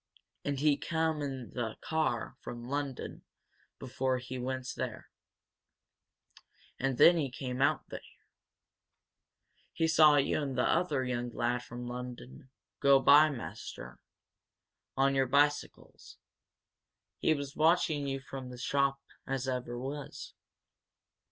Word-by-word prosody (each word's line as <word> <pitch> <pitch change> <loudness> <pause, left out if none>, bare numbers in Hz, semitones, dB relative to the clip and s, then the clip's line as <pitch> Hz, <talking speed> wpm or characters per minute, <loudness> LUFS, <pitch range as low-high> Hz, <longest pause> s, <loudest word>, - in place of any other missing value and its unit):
And 145 -1 -2
he 145 +1 +3
come 160 -2 -1
in 135 -4 -5
the 115 -3 -3
car 155 -8 -1
from 120 0 -8
Lunnon 140 -1 -4 0.6
before 130 0 -1
he 125 0 -6
went 130 +1 -3
there - - -5 1.7
and 135 -1 0
then 170 0 +7
he 145 -4 0
come 125 0 -5
out 140 - +3
here. - - -7 1.7
He 165 - +1
saw 155 -2 +6
you 140 +2 +2
and 135 -3 -3
t'other 155 -6 +1
young 120 -1 -2
lad 120 +1 -1
from 120 0 -8
Lunnon 125 +2 -8 0.3
go 140 -1 +6
by, 150 +3 +7
maister, 90 - -8 1.0
on 135 +1 +3
your 135 -1 +2
bicycles. 145 +2 0 1.0
He 155 - +3
was 140 -1 -6
watching 160 -2 +2
you 135 0 -3
from 135 -1 -8
the 125 - -9
shop 140 +2 0 0.3
as 135 -1 -2
ever 125 -2 -3
was." 140 +3 -6
135 Hz, 120 wpm, -31 LUFS, 125-145 Hz, 1.7 s, then